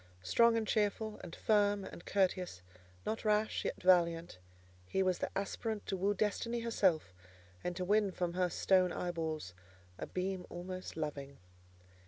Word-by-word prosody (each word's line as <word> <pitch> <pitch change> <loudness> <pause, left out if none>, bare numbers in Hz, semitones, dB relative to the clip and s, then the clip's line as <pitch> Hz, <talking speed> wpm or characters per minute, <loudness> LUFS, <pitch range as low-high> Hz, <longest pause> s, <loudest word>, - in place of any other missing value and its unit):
Strong 230 - +4
and 220 -1 -1
cheerful, 215 +1 0
and 170 - -7
firm 205 -2 +2
and - - -10
courteous; 185 - 0 0.4
not 220 - -2
rash, 215 0 +1
yet - - -2
valiant; 170 - +3 0.5
he 190 - +1
was 185 -1 +1
the - - -1
aspirant 210 +2 -3
to - - -2
woo 200 +2 +1
Destiny 230 +3 0
herself, 190 - +1 0.5
and 180 - -2
to 180 0 -2
win 205 0 +3
from 175 -1 -2
her 180 0 +1
stone 185 +1 +3
eyeballs 160 - -3 0.5
a - - -4
beam 185 0 -3
almost 185 0 -6
loving. 140 -3 -4
185 Hz, 150 wpm, -34 LUFS, 175-210 Hz, 0.5 s, Strong